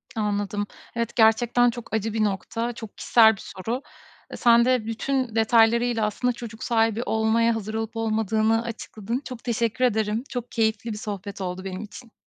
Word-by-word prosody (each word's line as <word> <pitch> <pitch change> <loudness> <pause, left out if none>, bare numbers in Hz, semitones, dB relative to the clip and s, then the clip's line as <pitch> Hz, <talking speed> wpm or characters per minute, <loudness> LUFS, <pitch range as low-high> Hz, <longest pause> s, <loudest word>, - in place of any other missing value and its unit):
Anladım. 205 -1 -1 0.3
Evet, 235 -1 -2
gerçekten 240 +2 +4
çok 235 -1 -8
acı 220 0 -1
bir 220 -1 +1
nokta. 225 +4 -2
Çok 225 -2 -10
kişisel 220 -2 +5
bir - - -12
soru. 230 +7 -5 0.5
Eee, - - -6
sen 235 -1 +5
de 255 -3 +2
bütün 235 +1 -2
detaylarıyla 230 +1 +3
aslında 245 +4 0
çocuk 230 -1 -8
sahibi 225 -1 +1
olmaya 225 0 +2
hazır 215 -1 -5
olup 225 +1 -3
olmadığını 220 0 +1
açıkladın. 230 +1 -5
Çok 250 -3 -8
teşekkür 235 +1 0
ederim. 220 -1 0
Çok 245 -2 -5
keyifli 225 0 0
bir - - -6
sohbet 200 -2 -6
oldu 185 0 -4
benim 190 0 -5
için. 225 +2 -12
225 Hz, 165 wpm, -25 LUFS, 215-235 Hz, 0.5 s, kişisel